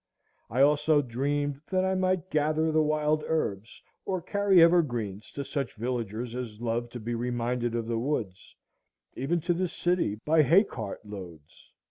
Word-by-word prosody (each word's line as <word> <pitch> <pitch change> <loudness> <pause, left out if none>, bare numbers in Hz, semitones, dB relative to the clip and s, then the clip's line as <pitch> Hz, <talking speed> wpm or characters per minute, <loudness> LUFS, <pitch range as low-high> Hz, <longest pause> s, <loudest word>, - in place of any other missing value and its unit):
I 125 +5 +1
also 150 +1 +4
dreamed 140 +3 -2
that 185 0 +1
I 190 - +1
might 185 -1 0
gather 155 +1 +1
the 155 0 +3
wild 155 0 +1
herbs, 110 -9 -2 0.2
or 185 -1 -2
carry 200 +1 +3
evergreens 120 - +2
to 140 - -4
such 135 -5 -3
villagers 115 0 -3
as 120 -4 -6
loved 120 0 -2
to 120 - -5
be 120 +2 -4
reminded 120 0 -1
of 115 -1 -1
the 115 0 -1
woods, 115 -8 -3 0.6
even 160 +7 -1
to 175 +2 +1
the 180 +2 0
city, 175 - 0
by 155 +1 +5
hay 170 - +6
cart 110 - -7
loads. 90 -7 -11
140 Hz, 160 wpm, -28 LUFS, 115-160 Hz, 0.6 s, hay